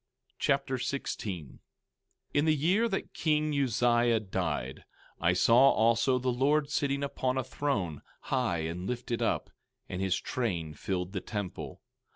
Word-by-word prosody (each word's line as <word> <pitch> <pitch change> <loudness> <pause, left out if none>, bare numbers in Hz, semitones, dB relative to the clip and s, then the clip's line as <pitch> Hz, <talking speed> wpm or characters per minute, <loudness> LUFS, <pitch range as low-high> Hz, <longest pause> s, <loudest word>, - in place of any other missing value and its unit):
2 - - -34
Nephi - - -55 0.2
Chapter 135 -1 -2
16 105 - -3
16:1 - - -18 0.7
In 145 +1 +3
the 155 -1 +4
year 190 +11 +2
that 195 - -3
king 155 -1 +1
Uzziah 120 -3 +3
died, 80 - -3 0.4
I 85 +2 +3
saw 120 +8 +6
also 115 +3 +3
the 125 0 0
Lord 145 +4 +2
sitting 140 -1 0
upon 130 -2 -1
a 130 - +1
throne, 105 - -2 0.2
high 120 -11 0
and 85 +3 -4
lifted 120 -1 -3
up, - - 0 0.4
and 95 0 -4
his 95 -1 +1
train 90 -11 -2
filled 90 +3 -3
the 95 - -2
temple. 100 -4 -5
120 Hz, 155 wpm, -30 LUFS, 95-140 Hz, 0.7 s, saw